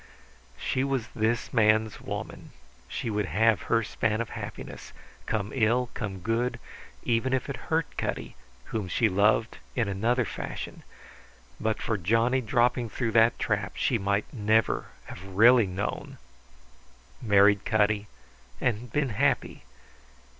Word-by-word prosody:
She 130 - -1
was 135 -4 -1
this 110 +2 -1
man's 110 -2 +3
woman. - - -7 0.3
She 115 - -4
would 105 -2 -1
have 110 +6 +3
her 115 -1 +3
span 110 +1 -1
of 115 - -2
happiness, - - -8 0.3
come 105 -1 -1
ill, 120 0 +2
come 95 -4 -5
good, 115 +5 -1 0.4
even 120 +2 +1
if 130 - 0
it - - -3
hurt - - +2
Cutty, - - -3 0.4
whom 110 -4 -2
she 110 +5 +2
loved 105 +3 +2 0.2
in 120 -4 +1
another 115 +5 +1
fashion. - - -6 0.8
But 110 0 -1
for 110 -3 -2
Johnny 115 +8 +2
dropping 120 +1 +1
through 115 +1 -2
that 115 +1 +4
trap 100 -3 -1
she 120 - +1
might 100 +1 0
never 110 -1 +1 0.2
have 85 - -10
really 110 +4 +5
known, 95 +2 -4 1.0
married 100 -2 +4
Cutty, 105 -1 +1 0.5
and 120 0 -1
been 145 0 0
happy. 105 - 0
110 Hz, 130 wpm, -27 LUFS, 105-120 Hz, 1.0 s, really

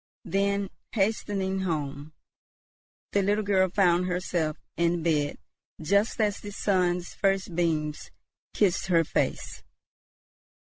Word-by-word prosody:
Then, 200 0 0 0.2
hastening 195 -2 0
home, 150 -4 -3 1.0
the 200 - +2
little 205 +2 +1
girl 190 -2 +3
found 180 -2 +3
herself 180 -4 -1 0.2
in 170 0 +1
bed 150 -3 +1 0.4
just 200 +9 +1
as 210 -2 +1
the 205 - -8
sun's 180 -3 0
first 195 -3 0
beams 155 -3 -1 0.5
kissed 190 -2 +2
her 170 -3 +4
face. - - -2
185 Hz, 105 wpm, -27 LUFS, 165-200 Hz, 1.0 s, her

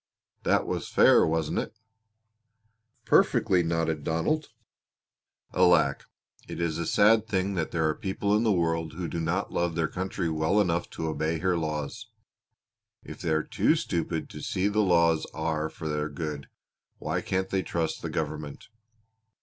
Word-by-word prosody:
That - - +2
was - - -3
fair, - - +5
wasn't 80 -1 0
it?" - - -5 1.3
"Perfectly!" 90 -2 +3
nodded 80 -2 -1
Donald. 85 - 0 1.1
"Alack! 85 -6 +3 0.4
It - - -7
is 85 -1 -1
a 85 - -2
sad 110 +1 +4
thing 100 -1 0
that 85 -4 -1
there 80 -2 0
are 75 - +1
people 100 +3 -1
in 105 - +3
the 115 -2 +2
world 80 -3 0
who 85 +1 -4
do 85 +2 -4
not 80 - -1
love 85 -1 0
their 80 -2 +1
country 95 -1 -3
well 80 +5 +1
enough 85 -4 0
to - - -2
obey 80 +1 -1
her 90 +2 +1
laws. 80 +7 -3 1.0
If - - -10
they 85 - -2
are 80 0 +2
too - - +2
stupid - - -2
to - - -8
see 95 +2 0
the 105 +1 0
laws 85 -4 +3
are 80 -1 -1
for 80 - -7
their 75 0 -2
good 75 -1 -5 0.5
why - - -2
can't 95 0 -2
they 95 - 0
trust 85 -3 -2
the - - -4
government? 75 0 -5
85 Hz, 160 wpm, -27 LUFS, 80-95 Hz, 1.3 s, fair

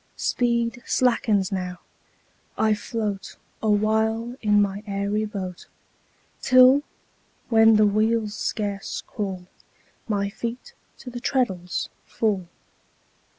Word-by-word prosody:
Speed 235 -1 0
slackens 225 -7 +2
now, 180 -2 -3 0.8
I 220 -1 +3
float 210 -2 -4 0.3
Awhile 220 +2 +1
in 210 -1 +4
my 200 0 0
airy 200 +2 -1
boat; 190 -4 -6 0.7
Till, 255 +2 +7 0.7
when 225 -1 +6
the 215 0 +5
wheels 215 +1 +1
scarce 205 -1 -3
crawl, 190 -3 -5 0.6
My 200 -2 0
feet 235 +3 -6 0.2
to 250 - -9
the 240 - -6
treadles 190 -10 -1 0.2
fall. 200 -5 -1
215 Hz, 100 wpm, -24 LUFS, 200-230 Hz, 0.8 s, Till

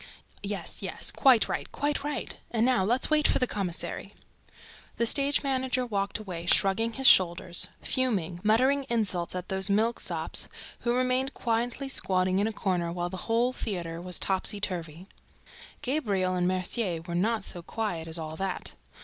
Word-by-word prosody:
"Yes, 200 -1 -2
yes, - - -1
quite 260 -5 +5
right, - - -4
quite 290 -1 -1
right. 295 -1 -4
And 230 -1 +1
now 250 -6 +3
let's 245 +9 +2
wait 305 0 +4
for - - +3
the 255 - +2
commissary." 195 -7 -4 0.8
The 235 - +2
stage 280 +5 +2
manager 260 -2 0
walked 200 -4 -1
away, 180 -5 -7
shrugging 225 +6 +3
his 265 +2 -4
shoulders, 175 -4 +5 0.2
fuming, 195 -10 0
muttering 260 +6 +3
insults 195 -7 0
at 180 0 -5
those 190 +1 +3
milksops 220 +4 0 0.3
who 240 0 0
remained 255 +1 +1
quietly 240 +3 -1
squatting 185 -7 +1
in 205 - +2
a - - -1
corner 180 -5 -1
while 175 0 -3
the 190 - -5
whole 235 +2 +2
theater 170 -8 -4
was 180 -1 -3
topsyturvy. 185 -4 -2 0.8
Gabriel 205 -10 0
and 180 -1 +1
Mercier 185 -1 -1
were 170 0 -6
not 210 +4 +1
so 175 - -7
quiet 170 -4 -3
as 160 +1 +1
all 160 -1 -5
that. 190 0 -3
205 Hz, 160 wpm, -28 LUFS, 180-245 Hz, 0.8 s, quite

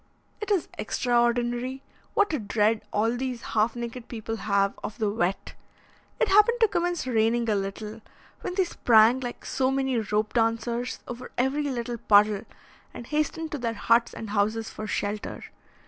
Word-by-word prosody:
It 425 - -4
is 390 -5 +1
extraordinary 240 +2 0 0.3
what 410 -4 +3
a 300 - 0
dread 215 +1 +1
all 225 +3 +1
these 250 -1 -4
half 220 +2 +2
naked 235 0 -6
people 225 -1 -5
have 200 -2 +1
of 220 - -5
the 215 -3 0
wet. 195 -3 -1 0.7
It 470 - +3
happened 425 +5 +5
to 450 - +7
commence 350 -4 -1
raining 230 -1 +1
a - - +2
little, 210 +3 -4 0.4
when 360 - -5
they 380 - +3
sprang 235 -7 +4
like 245 -2 -6
so 260 -1 +1
many 265 -2 0
rope 215 0 -1
dancers 235 +1 0
over 245 +1 -7
every 265 +4 +1
little 240 -2 -3
puddle, 205 0 +4 0.5
and 240 - -9
hastened 305 +3 -2
to 295 - -3
their 230 -2 -2
huts 230 +3 +3
and 220 -2 -6
houses 215 +2 0
for 215 - -6
shelter. 205 0 -3
235 Hz, 160 wpm, -26 LUFS, 215-260 Hz, 0.7 s, to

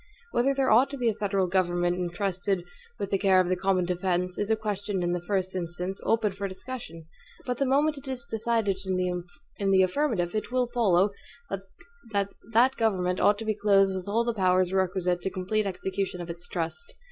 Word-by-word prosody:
Whether 270 +3 +2
there 270 -1 +2
ought 245 +6 +6
to 280 - -6
be 240 -3 +2
a - - 0
federal 200 -2 0
government 175 -1 +1
intrusted 180 +1 -1 0.3
with 200 -3 -4
the 195 - +2
care 190 -1 +5
of 180 -1 +2
the 185 - +2
common 185 -1 +1
defense, 180 0 -1
is 205 - -1
a 220 - +4
question 205 -3 -2
in 175 - 0
the 175 0 -1
first 185 0 -1
instance, 180 +2 -4
open 220 -2 +2
for 200 +1 -4
discussion; 190 -5 -8 0.4
but 250 -1 -2
the 275 - +2
moment 290 +2 +2
it 275 - -13
is 255 -3 -3
decided 225 -4 0
in 190 - +1 0.8
the 190 - +6
affirmative, 185 -4 0
it 215 +2 -3
will 250 -1 +1
follow, 200 -5 +3 1.0
that 200 -1 0 0.2
that 245 +4 +4
government 185 -5 +1
ought 205 - +4
to 225 - -6
be 215 - +1
clothed 200 -2 +3
with 185 0 -5
all 225 +3 +2
the 235 0 -1
powers 185 -2 +2
requisite 180 -2 +1
to - - -1
complete 200 +3 -1
execution 190 0 -3
of 170 -1 -5
its 175 +1 -8
trust. 470 - -4
195 Hz, 195 wpm, -27 LUFS, 180-225 Hz, 1.0 s, ought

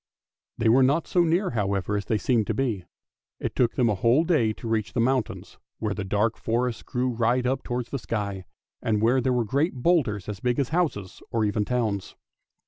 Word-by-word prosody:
They 115 - +1
were 120 +4 +6
not 140 +5 +3
so 175 - +2
near, 175 +4 +1
however, 100 -3 -1
as 100 -1 -2
they 110 - +1
seemed 110 +1 +1
to 110 - -1
be; 110 -9 -1 0.5
it - - -4
took 120 -2 +2
them 125 -3 +3
a 110 - +2
whole 115 - +3
day 155 -11 +2
to 115 - -8
reach 110 -2 -1
the - - -1
mountains, 130 0 -1 0.2
where 105 -2 -2
the 105 - -4
dark 105 +3 0
forests 120 0 -1
grew 125 +1 -1
right 120 +2 +1
up 130 +2 0
towards 120 -1 -4
the 140 - -2
sky, 100 -4 -3 0.4
and 110 -2 +1
where 120 +4 +3
there 130 - +1
were 120 -2 +1
great 140 - 0
boulders 125 - +1
as 105 -3 -5
big 125 +2 0
as 140 -3 0
houses, 145 - -1
or 115 -2 +1
even 105 0 0
towns. 110 -6 -2
115 Hz, 210 wpm, -26 LUFS, 105-130 Hz, 0.5 s, were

